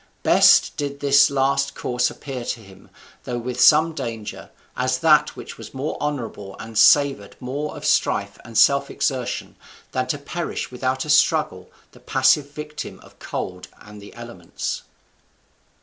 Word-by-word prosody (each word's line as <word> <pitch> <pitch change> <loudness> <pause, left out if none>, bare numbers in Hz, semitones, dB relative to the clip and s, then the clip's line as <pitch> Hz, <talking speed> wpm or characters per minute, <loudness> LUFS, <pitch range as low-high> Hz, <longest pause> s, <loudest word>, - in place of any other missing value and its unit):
Best - - +5
did 140 -1 -4
this 140 0 +5
last 140 0 0
course 125 0 0
appear 130 -4 -7
to 120 - -4
him, 95 -3 -17 0.3
though 120 - -4
with 125 +1 -3
some 160 +2 +6
danger, 115 -7 -6 0.3
as 130 0 0
that 150 +1 +3
which - - -10
was - - -11
more 140 +4 -3
honourable 115 -9 -4
and 115 0 -10
savoured 110 0 +4
more 140 +4 -5
of - - -8
strife - - +1
and 115 -1 -7
self 140 0 +4
exertion 135 -3 -3 0.4
than 130 0 -1
to 145 - -1
perish 160 +2 -5
without 130 +2 -2
a - - -8
struggle 145 - +2 0.2
the - - -18
passive 135 +2 +2
victim 150 +1 -8
of - - -19
cold - - -6
and 105 0 -13
the 100 - -12
elements. 115 -8 -6
130 Hz, 150 wpm, -22 LUFS, 120-145 Hz, 0.4 s, some